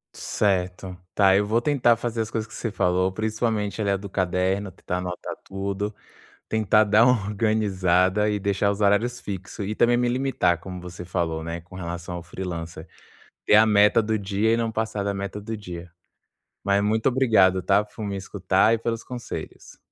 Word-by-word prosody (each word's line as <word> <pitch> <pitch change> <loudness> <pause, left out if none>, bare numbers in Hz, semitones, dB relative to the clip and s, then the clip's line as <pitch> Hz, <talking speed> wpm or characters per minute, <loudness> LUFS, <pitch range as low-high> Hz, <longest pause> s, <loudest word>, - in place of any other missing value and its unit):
Certo. 95 -2 -1 0.2
Tá, 95 -2 +5
eu 100 - +3
vou 110 +3 +2
tentar 120 -4 +3
fazer 115 -1 -3
as 110 - -3
coisas 110 -1 -3
que - - -15
você 115 - -4
falou, 90 -1 +1
principalmente 110 0 -2
ali 100 - 0
a 100 - +2
do 100 +1 -8
caderno, 95 +1 -1
tentar 90 +1 -4
anotar 90 -1 -5
tudo, 100 +2 -4 0.6
tentar 110 0 +3
dar 110 +2 +5
uma 125 -5 +3
organizada 100 -2 +2
e 105 - 0
deixar 100 0 0
os 100 +1 -2
horários 115 +5 +2
fixo 95 0 -6
e 105 +2 -2
também 120 +2 +3
me 120 0 +1
limitar 125 -10 +1
como 90 0 -8
você 90 0 -8
falou, 80 -3 -2
né? 85 0 -5
Com 90 +2 -15
relação 85 0 -5
ao 85 - -6
freelancer. 85 -1 -6 0.6
Ter - - +5
a 110 - +7
meta 105 +1 +5
do 110 0 0
dia 100 +2 0
e 115 - +2
não 115 -1 -1
passar 110 -2 -2
da 100 0 -1
meta 100 +1 -5
do 110 +2 -5
dia. 90 -4 -8 0.7
Mas 100 +1 +2
muito 110 +4 +2
obrigado, 105 -8 +3
tá? 100 +3 +3
Por 105 +1 -10
me 100 -1 -3
escutar 95 +2 +1
e - - -3
pelos 115 0 -3
conselhos. 125 -1 -8
100 Hz, 185 wpm, -24 LUFS, 95-110 Hz, 0.7 s, a